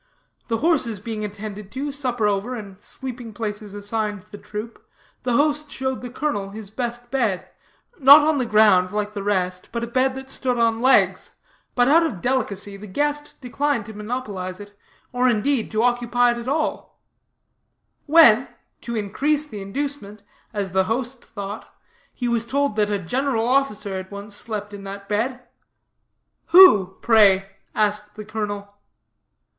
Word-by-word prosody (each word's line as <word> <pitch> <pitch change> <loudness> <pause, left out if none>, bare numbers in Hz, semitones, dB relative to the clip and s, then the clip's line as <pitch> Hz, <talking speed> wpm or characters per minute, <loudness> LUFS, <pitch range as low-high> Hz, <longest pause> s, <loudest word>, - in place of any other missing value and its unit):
The 230 - 0
horses 265 - +1
being 215 +1 -5
attended 210 -1 -7
to, 280 +2 -3
supper 250 -5 -1
over, 205 +5 0
and 200 -3 -9
sleeping 245 -3 -7
places 210 -2 -5
assigned 205 0 -3
the 205 - -8
troop, 215 +2 -8 0.4
the 250 -1 -1
host 295 +3 +1
showed 265 -2 -3
the 245 - -6
colonel 235 -7 -2
his 210 0 -9
best 240 0 -5
bed, 230 -9 0 0.5
not 285 +2 +9
on 310 -2 +2
the 250 - -1
ground 210 -4 +5
like 210 0 -2
the 205 - -4
rest, 185 -2 -1
but 235 0 -3
a - - 0
bed 255 +2 +1
that 265 0 -8
stood 250 -2 -1
on 230 -1 +2
legs. 260 +1 +3 0.4
But 245 -1 +4
out 315 +4 +6
of 310 - -2
delicacy, 205 -4 -1
the 210 +2 -10
guest 295 +7 -2
declined 270 -1 -1
to 220 - -9
monopolize 210 -4 -5
it, 205 0 -12 0.4
or, 250 +1 +3
indeed, 235 +2 +1
to 220 +1 0
occupy 245 0 +2
it 240 - -3
at 235 - -8
all; 305 +3 -2 1.1
when, 275 -6 +7 0.3
to 235 - -5
increase 280 +9 0
the 215 -9 -8
inducement, 210 -1 -5 0.3
as 200 -4 -3
the 190 +1 +2
host 245 +4 -3
thought, 205 -1 -7 0.4
he 245 - -4
was 235 -1 +1
told 280 0 0
that 210 -1 +2
a 205 - 0
general 235 +5 -1
officer 235 -7 0
had 190 0 -7
once 200 +1 -6
slept 210 -1 -5
in 200 -1 -8
that 200 0 -8
bed. 235 +5 -1 1.1
"Who, 210 - +7
pray?" 195 -4 +5 0.2
asked 210 0 0
the 215 0 -8
colonel. 205 -1 -5
225 Hz, 160 wpm, -22 LUFS, 205-255 Hz, 1.1 s, not